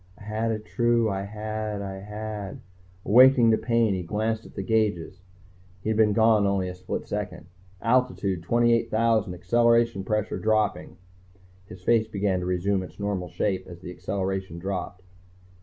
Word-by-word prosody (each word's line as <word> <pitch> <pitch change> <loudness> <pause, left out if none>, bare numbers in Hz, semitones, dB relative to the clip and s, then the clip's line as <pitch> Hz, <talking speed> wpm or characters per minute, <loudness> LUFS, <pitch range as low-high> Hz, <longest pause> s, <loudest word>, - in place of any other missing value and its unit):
_I - - -13
had 110 +2 -2
a 110 - -1
true 115 +1 +1
I 95 0 -2
had 110 0 -4
I 95 -1 -5
had 105 0 -6
_ - - -12 0.5
Awakening 125 +1 +6
to 110 - +4
pain, 115 -2 +2
he 95 - -2
glanced 110 +5 -2
at - - -18
the 95 - -3
gauges. 100 -5 0 0.6
He - - -2
had - - 0
been 105 -2 +4
gone 110 -2 +4
only 100 -2 0
a 90 - -5
split 90 0 -5
second. 90 -5 -5 0.4
"Altitude 115 -7 +1
28,000, 115 -1 +2
acceleration 115 +1 +2
pressure 105 +1 -1
dropping." 110 0 0 0.7
His 90 -4 -12
face 115 +1 +3
began 100 -3 -1
to 90 - -4
resume 95 +2 0
its 95 - -10
normal 100 -3 -2
shape 95 0 -2
as 85 -1 -11
the 90 - -7
acceleration 95 -2 -3
dropped. 90 0 -5
105 Hz, 160 wpm, -26 LUFS, 95-110 Hz, 0.7 s, Awakening